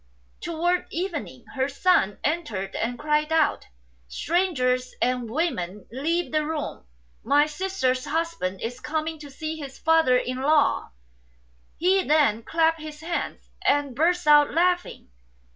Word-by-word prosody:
5 335 - -4
Towards 350 +2 +1
evening 320 -8 -4
her 265 0 0
son 280 - +2
entered 230 - -2
and 245 +2 -2
cried 300 +2 0
out, 320 -2 +2 0.2
" 65 -1 -36
Strangers 255 - 0
and 250 -2 0
women, 210 - -2
leave 330 +8 -1
the 310 0 +1
room! 300 - -4 0.4
My 290 +1 +4
sister's 300 -6 -1
husband 315 - -2
is 245 +2 -4
coming 315 +1 -3
to 295 -1 -10
see 310 +3 -5
his 275 -3 -8
father 320 -6 +4
in 255 0 -2
law." 290 0 +2 0.9
He 375 +3 +3
then 290 -9 +3
clapped 325 +4 +1
his 305 -1 -9
hands, 340 +2 -4
and 285 -3 +1
burst 350 +5 +2
out 295 -1 +6
laughing. 355 +2 0
300 Hz, 140 wpm, -25 LUFS, 255-330 Hz, 0.9 s, out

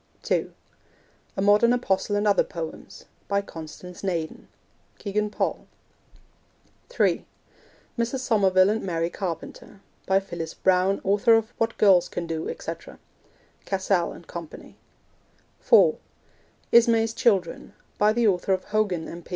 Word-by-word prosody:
(2) - - 0 0.9
A - - 0
Modern 210 +4 +5
Apostle 205 -4 0
and 205 +1 +1
Other 200 - +4
Poems. 165 -2 -8 0.2
By 200 0 0
Constance 170 +1 -10
Naden. 170 -5 -3 0.5
(Kegan 210 +1 -2
Paul.) - - -3 1.2
(3) - - +1 0.8
Mrs. 235 +3 0
Somerville 195 -5 +3
and 220 +1 -1
Mary 170 -2 -2
Carpenter. 185 +2 -6 0.3
By 190 0 +4
Phyllis 170 -4 -7
Browne, 190 +1 +2
Author 205 +4 +4
of 225 +1 0
What 225 0 -1
Girls 185 -4 +5
Can 175 - -4
Do, 165 -1 -4
etc. - - -7 0.7
(Cassell 190 -2 0
and 170 - -12
Co.) 170 -1 -7 1.1
(4) - - +5 0.7
Ismay's 230 -1 +4
Children. 195 -7 0 0.3
By 210 +1 +4
the 235 0 +2
Author 190 0 +1
of 185 - -1
Hogan, 205 -6 -1
M.P. 170 0 -10
195 Hz, 125 wpm, -25 LUFS, 175-215 Hz, 1.2 s, Modern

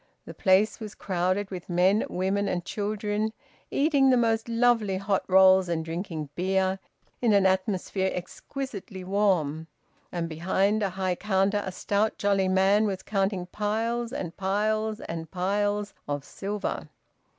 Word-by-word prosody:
The - - -8
place 195 +3 +3
was 215 -2 -7
crowded 185 +2 -1
with 180 -1 -7
men, 185 +4 +3
women, 195 +2 0
and 175 -1 -2
children 210 +1 -2 0.4
eating 280 -2 +3
the 255 - +5
most 225 -1 +1
lovely, 230 -4 +2
hot 195 0 0
rolls 190 -1 +6
and 160 -2 -1
drinking 165 -3 -4
beer, 190 +2 0 0.4
in 235 -3 +3
an 200 -1 +4
atmosphere 190 0 +1
exquisitely 195 +1 -6
warm. 180 -6 +1 0.4
And 170 -1 -2
behind 190 +6 +1
a 200 - +1
high 185 0 -1
counter 195 +1 +1
a 190 - -4
stout 205 +3 0
jolly 200 -2 +2
man 195 +3 +3
was 190 -2 -3
counting 195 -2 -1
piles 225 +5 -2
and 180 - -5
piles 215 +3 0
and 165 -1 -6
piles 205 +3 -1
of 145 -1 -3
silver. 200 +1 -4
195 Hz, 140 wpm, -27 LUFS, 185-210 Hz, 0.4 s, rolls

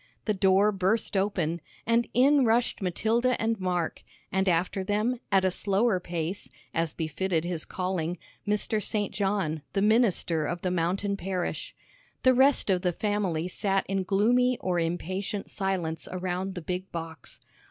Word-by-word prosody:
The 215 - +2
door 195 +1 +4
burst 195 +3 0
open, 180 -4 0 0.2
and 230 +1 +2
in 275 +3 +5
rushed 235 0 +2
Matilda 225 +7 +1
and 225 -1 0
Mark, 180 -3 -1 0.3
and 190 +1 +2
after 180 +3 +1
them, 215 +5 0
at 190 -1 +4
a 185 - +3
slower 200 +2 +1
pace, 175 +2 -4 0.2
as 165 -1 0
befitted 165 +2 -1
his 175 -3 -3
calling, 180 -2 -2 0.3
Mr. 210 +1 0
St. 205 0 -1
John, 195 -6 0
the 195 - +1
minister 205 -8 +2
of 175 0 -4
the 180 - 0
mountain 185 +4 0
parish. 185 -2 -3 0.5
The 255 - +6
rest 265 -4 +4
of 180 -1 +2
the 180 - +1
family 190 -5 -1
sat 195 +1 0
in 195 0 -1
gloomy 240 +6 +3
or 180 -2 0
impatient 185 +4 -3
silence 185 -5 -2
around 185 +1 -3
the 175 - -4
big 180 +2 -4
box. 165 -5 -6
190 Hz, 150 wpm, -28 LUFS, 175-210 Hz, 0.5 s, The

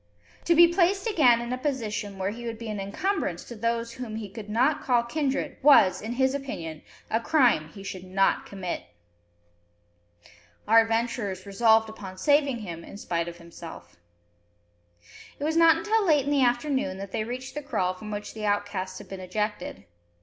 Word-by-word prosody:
To 340 - +4
be 340 +1 +9
placed 365 +3 +2
again 255 - +4
in 240 +1 -3
a 255 - -3
position 220 -8 -3
where 190 +1 -1
he 235 +2 -7
would 230 -1 -4
be 230 -1 -7
an 210 -1 -3
incumbrance 370 - -2
to - - -9
those 230 +1 -1
whom 235 -3 -6
he 215 -2 -5
could 210 0 -9
not 255 +8 +2
call 245 -2 +2
kindred 275 +2 -2
was, 200 -10 +6
in 225 +3 -4
his 260 +1 +2
opinion, 170 - -5 0.3
a 225 - +2
crime 240 - +3
he 195 +4 -11
should 185 -2 -6
not 195 +1 +1
commit! 190 -3 -5 1.8
Our 225 +2 +7
adventurers 225 -4 -2
resolved 220 +2 +4
upon 195 -4 -9
saving 280 +1 +2
him 170 -4 -7
in - - -10
spite 170 -4 -2
of 170 0 -7
himself. 170 - -11 1.4
It - - -6
was 315 +2 0
not 330 -1 +6
until 425 +5 +1
late 300 -7 +3
in 285 - -1
the 285 -2 +3
afternoon 245 -5 0
that 195 0 -7
they 215 - -1
reached 255 +3 -6
the 295 - -4
kraal 185 -10 -1
from 210 +3 -9
which 210 0 -5
the 220 - -7
outcasts 200 -2 -2
had - - -10
been 195 - -7
ejected. 185 - -4
225 Hz, 180 wpm, -26 LUFS, 195-270 Hz, 1.8 s, be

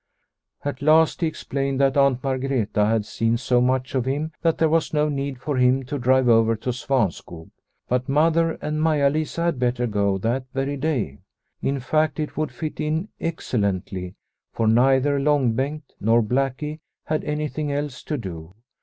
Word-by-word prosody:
At 140 -3 -3
last 160 +3 +4
he 165 - +3
explained 135 -3 -3
that 135 -1 +3
Aunt 140 -3 +3
Margreta 130 -6 0
had 110 -2 +1
seen 115 +2 0
so 125 0 +2
much 130 +1 0
of 130 -3 0
him 145 +4 -2
that 165 -2 +2
there 160 - +3
was 160 0 +1
no 150 0 +2
need 140 -2 -3
for 145 +1 -2
him 125 +1 +3
to 145 +2 -4
drive 130 +1 +3
over 115 -1 +4
to 120 +4 -3
Svanskog. 105 - -2 0.4
But 125 +2 -1
Mother 165 +3 +3
and 155 0 -1
Maia 150 -3 +3
Lisa 155 +2 -2
had 170 -6 0
better 125 0 0
go 100 -3 +1
that 120 +6 -1
very 135 +1 -1
day; 130 - -2 0.4
in 140 0 -1
fact, 155 +4 0
it 150 - -3
would 155 -1 -2
fit 155 -2 -6
in 160 +6 -1
excellently, 100 - -2 0.4
for 115 - 0
neither 135 +5 +4
Long 140 -4 +2
Bengt 145 +5 -2 0.2
nor 115 +2 +3
Blackie 135 +6 -1 0.3
had 155 0 -1
any 150 0 -2
thing 150 0 -3
else 145 -2 -3
to 150 - -2
do. 90 - -8
135 Hz, 175 wpm, -23 LUFS, 120-150 Hz, 0.4 s, last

